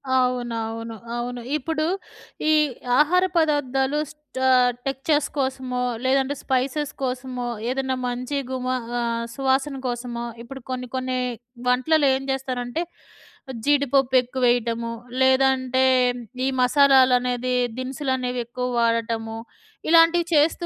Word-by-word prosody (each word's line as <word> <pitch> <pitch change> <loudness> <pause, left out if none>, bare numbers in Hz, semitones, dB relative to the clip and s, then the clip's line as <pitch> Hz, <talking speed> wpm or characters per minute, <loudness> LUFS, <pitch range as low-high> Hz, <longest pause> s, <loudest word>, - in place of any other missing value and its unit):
అవునవును. 230 -3 -1 0.2
అవును. 245 0 -4 0.2
ఇప్పుడు 310 +2 -2 0.6
ఈ - - +5 0.5
ఆహార 360 +5 +4
పదార్థాలు 290 -2 +1
స్ట్ 300 -3 -11
ఆహ్, 250 -1 +5 0.2
టెక్చర్స్ 275 +2 0
కోసమో, 260 -2 -2 0.2
లేదంటే 270 +2 +2
స్పైసెస్ 275 +3 -1
కోసమో 250 -1 -3 0.2
ఏదైనా 265 0 -1
మంచి 250 +3 -3
గుమ 255 -1 -3 0.3
ఆహ్, 235 0 -1
సువాసన 270 +1 0
కోసమో 240 -1 -4 0.2
ఇప్పుడు 265 +2 -9
కొన్ని 250 -1 -4
కొన్ని 255 0 -1 0.5
వంటలలో 280 +4 +3
ఏం 270 - -4
జేస్తారంటే, 260 +3 -2 0.8
జీడిపప్పెక్కువేయటము, 250 -4 +2 0.3
లేదంటే 260 0 +3 0.6
ఈ - - +2
మసాలాలనేది, 255 -2 +4 0.2
దినుసులునేవెక్కువ 255 -2 -2
వాడటము, 230 -1 0 0.5
ఇలాంటివి 335 +1 +6
చేస్తూ 320 +4 +3
260 Hz, 95 wpm, -23 LUFS, 245-275 Hz, 0.8 s, ఇలాంటివి